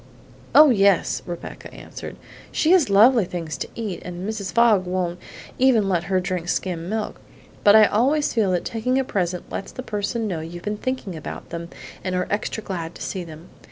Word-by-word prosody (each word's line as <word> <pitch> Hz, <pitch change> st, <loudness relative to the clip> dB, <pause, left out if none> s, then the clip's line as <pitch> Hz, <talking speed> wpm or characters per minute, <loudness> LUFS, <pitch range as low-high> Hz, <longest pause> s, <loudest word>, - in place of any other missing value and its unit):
"Oh, 300 Hz, -2 st, +9 dB
yes," 200 Hz, -5 st, +3 dB
Rebecca 175 Hz, -1 st, -7 dB
answered, -, -, -9 dB, 0.4 s
"she 315 Hz, -, +2 dB
has 360 Hz, -, +5 dB
lovely 225 Hz, +4 st, +6 dB
things 170 Hz, -4 st, -5 dB
to -, -, -3 dB
eat, 210 Hz, -6 st, -4 dB
and 180 Hz, +2 st, -6 dB
Mrs. 215 Hz, -4 st, -4 dB
Fogg 225 Hz, -6 st, +4 dB
won't 180 Hz, -1 st, -2 dB, 0.4 s
even 250 Hz, -6 st, +4 dB
let 175 Hz, -3 st, 0 dB
her 190 Hz, 0 st, +1 dB
drink 180 Hz, -2 st, -3 dB
skim 175 Hz, -2 st, -2 dB
milk; 215 Hz, 0 st, -3 dB, 0.4 s
but 205 Hz, 0 st, +7 dB
I 215 Hz, -1 st, +9 dB
always 270 Hz, +9 st, +2 dB
feel 220 Hz, -5 st, +2 dB
that 175 Hz, -, -1 dB
taking 240 Hz, +3 st, -1 dB
a 270 Hz, -, +2 dB
present 180 Hz, -7 st, -3 dB
lets 195 Hz, -, -5 dB
the 255 Hz, -, -7 dB
person 215 Hz, +1 st, -2 dB
know 175 Hz, -5 st, -2 dB
you've 170 Hz, +2 st, -8 dB
been 210 Hz, 0 st, -2 dB
thinking 255 Hz, -7 st, -3 dB
about 155 Hz, -, -8 dB
them 170 Hz, 0 st, -5 dB, 0.3 s
and 185 Hz, -1 st, -2 dB
are 180 Hz, -, 0 dB
extra 215 Hz, +1 st, -2 dB
glad 170 Hz, -4 st, -5 dB
to -, -, -7 dB
see 185 Hz, -2 st, -4 dB
them. 160 Hz, 0 st, -12 dB
195 Hz, 190 wpm, -23 LUFS, 175-225 Hz, 0.4 s, Oh